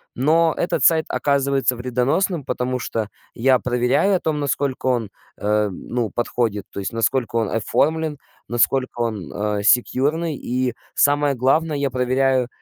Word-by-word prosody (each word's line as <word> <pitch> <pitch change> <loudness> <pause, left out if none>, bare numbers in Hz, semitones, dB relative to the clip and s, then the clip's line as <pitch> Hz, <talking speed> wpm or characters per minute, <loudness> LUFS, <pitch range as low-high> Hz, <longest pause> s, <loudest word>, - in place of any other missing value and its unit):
Но 160 +5 +3
этот 175 - -1
сайт 160 -1 +4
оказывается 140 -2 +1
вредоносным. 130 +8 0
Потому 125 0 -2
что 110 -3 -3 0.2
я 130 +2 +3
проверяю 125 +11 +1
о - - +1
том, 155 -3 -1
насколько 140 -2 -2
он, 120 -5 0 0.3
а, 105 0 +1
ну, 115 +4 -3
подходит, 115 -3 -2
то - - -6
есть 95 - -4
насколько 115 +1 0
он 110 -3 +1
оформлен, 155 +7 0 0.3
насколько 120 +1 0
он, 110 -7 -3
а, 105 0 -2
секьюрный, 145 +8 +2
и 125 -1 -2 0.2
самое 145 -1 +3
главное, 150 +5 +1
я 140 -1 0
проверяю 130 0 +1
130 Hz, 145 wpm, -21 LUFS, 120-145 Hz, 0.3 s, сайт